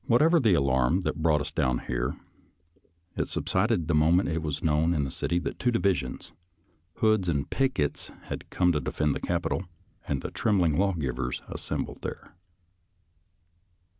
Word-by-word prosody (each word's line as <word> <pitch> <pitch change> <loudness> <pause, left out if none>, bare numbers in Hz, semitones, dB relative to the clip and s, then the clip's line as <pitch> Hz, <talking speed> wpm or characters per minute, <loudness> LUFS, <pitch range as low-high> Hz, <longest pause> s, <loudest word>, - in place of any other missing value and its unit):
Whatever 155 +8 +5
the 110 - +4
alarm 70 +3 +2
that 85 - -3
brought 80 -2 +3
us 75 0 -4
down 65 -6 +1
here, 60 0 -2 1.0
it - - -1
subsided 80 - 0
the 85 - +1
moment 80 +5 +4
it 80 0 -1
was 75 0 -3
known 80 +2 +2
in 75 - +1
the 65 - -3
city 85 - -1
that 90 - -3
two 125 - +2
divisions, 95 - -1 0.6
Hood's 110 -5 +2
and 70 -4 0
Pickett's, 130 - -1
had - - -7
come 90 -1 +2
to 75 - +1
defend 75 +2 0
the - - -3
Capital 85 +1 -1 0.4
and 70 -2 -2
the 90 - -4
trembling 90 -4 +2
lawgivers 70 -10 -1
assembled - - -4
there. - - -7
80 Hz, 155 wpm, -27 LUFS, 75-95 Hz, 1.0 s, Whatever